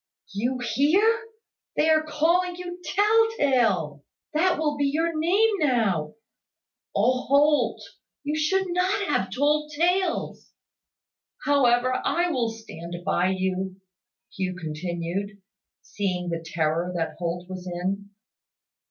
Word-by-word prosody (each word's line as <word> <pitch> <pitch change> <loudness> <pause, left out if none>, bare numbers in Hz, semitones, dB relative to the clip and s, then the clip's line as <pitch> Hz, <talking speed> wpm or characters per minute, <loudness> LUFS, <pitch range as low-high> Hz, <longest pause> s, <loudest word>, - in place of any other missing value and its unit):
"You 245 +6 -1
hear! 325 - +2 0.5
They 305 - +2
are 310 0 +4
calling 335 +4 +1
you 355 0 -7
`tell 440 +7 +3
tale.' 195 - +1 0.3
That 355 +4 +2
will 300 -2 0
be 285 0 0
your 325 +4 0
name 380 +8 +3
now. 220 - +1 0.8
Oh, 250 +5 +2
Holt! 295 +2 +3 0.4
You 295 +1 -2
should 380 +5 +1
not 370 +3 +1
have 190 -9 0
told 300 +7 +1
tales. 355 +3 0 0.9
However, 255 -3 +3
I 345 0 +1
will 240 -6 0
stand 175 -7 -8
by 180 -2 +2
you," 190 0 -2 0.6
Hugh 185 -1 -2
continued, 175 +4 -4 0.4
seeing 180 -3 -3
the 165 -1 -3
terror 165 +2 -1
that 165 -2 -2
Holt 175 +1 -3
was 185 -1 -7
in. 190 +3 -3
255 Hz, 115 wpm, -25 LUFS, -, 0.9 s, are